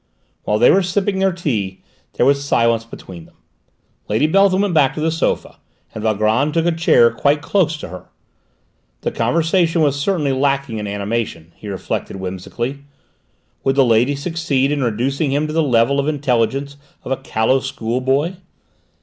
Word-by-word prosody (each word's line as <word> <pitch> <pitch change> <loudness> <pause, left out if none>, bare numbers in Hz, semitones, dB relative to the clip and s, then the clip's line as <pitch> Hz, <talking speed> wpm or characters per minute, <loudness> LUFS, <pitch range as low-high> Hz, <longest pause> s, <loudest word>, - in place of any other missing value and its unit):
While 105 - +1
they 120 - +6
were 195 - +4
sipping 190 +2 -1
their 190 0 +2
tea, 110 - -3 0.3
there - - +1
was 140 +1 +3
silence 115 -4 +1
between 90 -7 -11
them. - - -23 0.7
Lady 110 +7 +2
Beltham 195 +3 +3
went 200 -3 -1
back 140 -4 +3
to - - -4
the 160 +1 0
sofa, 165 - -2 0.4
and 110 - -6
Valgrand 110 +7 +1
took 165 0 +2
a 175 - +3
chair 160 -8 +4
quite 145 +5 +1
close 165 -3 +1
to 145 - -8
her. 90 +1 -10 0.9
The - - -2
conversation 165 0 +1
was 145 -2 +2
certainly 150 -5 0
lacking 135 -3 0
in 105 - -4
animation, 100 -5 -3
he 105 - -11
reflected 95 0 -4
whimsically; 95 +8 -5 0.8
would 135 - +1
the 135 -1 +4
lady 120 +4 +3
succeed 140 -3 -1
in 145 -2 0
reducing 135 +6 -1
him 145 +2 +1
to 155 - -4
the 165 - +2
level 130 -1 +2
of 140 - -1
intelligence 140 -1 -1 0.3
of - - -7
a 135 - +1
callow 130 0 +1
schoolboy? 135 +5 -1
135 Hz, 165 wpm, -19 LUFS, 115-155 Hz, 0.9 s, they